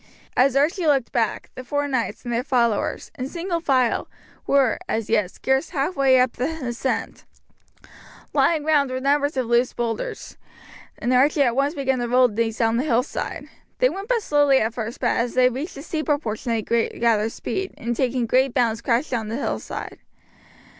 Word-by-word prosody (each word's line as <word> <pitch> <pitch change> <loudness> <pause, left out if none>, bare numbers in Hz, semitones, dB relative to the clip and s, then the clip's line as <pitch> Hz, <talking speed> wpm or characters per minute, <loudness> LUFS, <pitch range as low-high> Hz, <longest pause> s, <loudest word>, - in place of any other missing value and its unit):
As 260 +1 +3
Archie 315 +5 +2
looked 275 -5 +2
back, 230 -2 -1
the 255 - -8
four 285 +3 -1
knights 255 -4 -2
and 240 - -3
their 235 - +1
followers, 235 -6 0
in 255 - -2
single 340 +3 -3
file, 260 -7 +1 0.4
were, 270 -5 +3
as 220 -1 -2
yet, 210 -5 +2
scarce 265 - -1
halfway 275 -4 +2
up 250 -1 +3
the 250 +4 -2 0.2
ascent. 240 +2 -3 1.1
Lying 315 -3 +2
round 295 -3 +3
were 255 0 -3
numbers 285 +1 +1
of 255 - +1
loose 240 +2 +2
boulders, 230 -2 -4 0.6
and 245 - -1
Archie 280 +3 +4
at 240 -3 +1
once 280 +4 +1
began 265 -2 0
to 240 - -1
roll 250 +1 +5
these 225 0 -2
down 225 -1 +2
the 250 - +1
hillside. 250 -2 -1 0.3
They - - +4
went 390 -1 -6
but 475 -3 +1
slowly 290 -4 +4
at 220 -2 0
first, 230 0 -5
but - - +1
as 235 0 -1
they 255 0 +5
reached 270 +7 -5
the 280 - -8
steeper 310 -3 -1
portion 230 -3 -4
they 225 -2 0
gathered 230 -1 +1
speed, 385 +9 -4
and 235 +1 -3
taking 250 -1 0
great 260 +2 +2
bounds 230 -3 +1
crashed 245 +5 0
down 225 -4 -2
the 220 - -3
hillside. - - -5
255 Hz, 180 wpm, -23 LUFS, 235-285 Hz, 1.1 s, roll